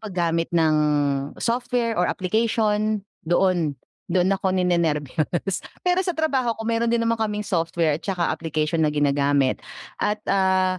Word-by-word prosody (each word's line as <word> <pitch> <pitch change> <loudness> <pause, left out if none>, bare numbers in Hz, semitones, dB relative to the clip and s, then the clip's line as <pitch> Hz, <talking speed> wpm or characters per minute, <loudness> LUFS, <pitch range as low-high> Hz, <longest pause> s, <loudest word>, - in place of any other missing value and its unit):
paggamit 170 -5 -1
ng 160 -2 +3 0.7
software 240 -2 0
or 180 - +3
application 215 +1 0 0.2
doon, 175 -4 +2 0.3
doon 180 +1 +2
ako 190 -1 0
ninenerbyos. 170 0 0 0.2
Pero 360 0 +2
sa 360 - -1
trabaho 265 -7 0
ko 225 - -7
meron 230 +1 0
din 235 -1 +2
naman 230 0 +1
kaming 210 -1 -1
software 165 -4 0
at - - -27
saka 180 -3 0
application 155 0 -1
na - - +2
ginagamit 140 -2 +2 0.4
at, 210 0 -1
ah, 190 -1 +2
185 Hz, 140 wpm, -23 LUFS, 165-220 Hz, 0.7 s, ng